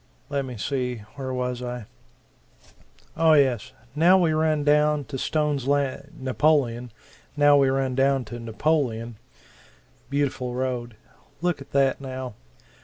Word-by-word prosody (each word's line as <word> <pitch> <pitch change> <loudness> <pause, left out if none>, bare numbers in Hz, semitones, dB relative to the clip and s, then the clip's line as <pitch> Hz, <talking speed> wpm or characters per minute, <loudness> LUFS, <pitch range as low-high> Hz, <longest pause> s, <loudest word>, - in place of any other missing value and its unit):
Let 140 -1 -1
me 125 -3 -7
see 125 -1 -2
where 130 -2 -5
was 125 -1 -2
I? 125 -2 -5 1.3
Oh 160 0 +5
yes 130 -4 +2 0.2
now 170 +6 +5
we 170 -4 +2
run 155 -1 +1
down 150 0 +3
to 140 -3 -6
Stone's 150 -3 0
Lan 140 0 0
Napoleon 130 -3 +1 0.5
now 145 0 +6
we 140 -2 +4
run 135 -1 0
down 135 0 +2
to 120 +3 -7
Napoleon. 115 -1 -1 0.9
Beautiful 135 -3 -1
road. 125 -3 -3 0.4
Look 175 -4 -1
at 135 - -12
that, 135 -1 +2
now. 130 -2 -6
135 Hz, 130 wpm, -25 LUFS, 125-145 Hz, 1.3 s, now